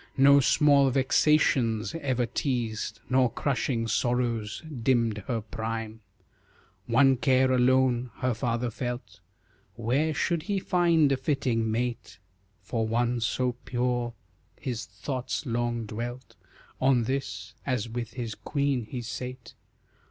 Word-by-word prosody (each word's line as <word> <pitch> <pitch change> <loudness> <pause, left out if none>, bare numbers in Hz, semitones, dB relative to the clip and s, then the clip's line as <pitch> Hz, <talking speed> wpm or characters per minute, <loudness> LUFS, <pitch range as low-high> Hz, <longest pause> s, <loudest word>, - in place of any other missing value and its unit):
No 140 +1 +7
small 140 0 +4
vexations 130 -3 +2
ever 130 -6 0
teased, 115 -5 -2
Nor 125 0 +3
crushing 125 -3 -1
sorrows 115 -2 -1 0.2
dimmed 115 -3 +2
her 115 -3 -1
prime. 110 0 -5 0.9
One 130 +2 +4
care 130 0 +3
alone, 130 -1 +3
her 130 -1 0
father 120 0 -1
felt 120 -5 -5 0.6
Where 125 +8 +1
should 170 +2 0
he 200 - +1
find 170 -5 +3
a 135 - +2
fitting 130 -5 0
mate 115 -3 -3 0.5
For 115 -2 -1
one 120 +2 +1
so 125 +2 0
pure? 120 -1 -1 0.5
His 120 -4 -4
thoughts 130 +9 -4
long 120 -1 -1
dwelt 120 +4 -6 0.5
On 130 -2 +4
this 110 -4 -3
as 125 -5 -1
with 115 0 -5
his 120 -3 -4
queen 140 -4 -1
he 120 +2 -6
sate. 125 +1 -7
125 Hz, 120 wpm, -27 LUFS, 115-130 Hz, 0.9 s, No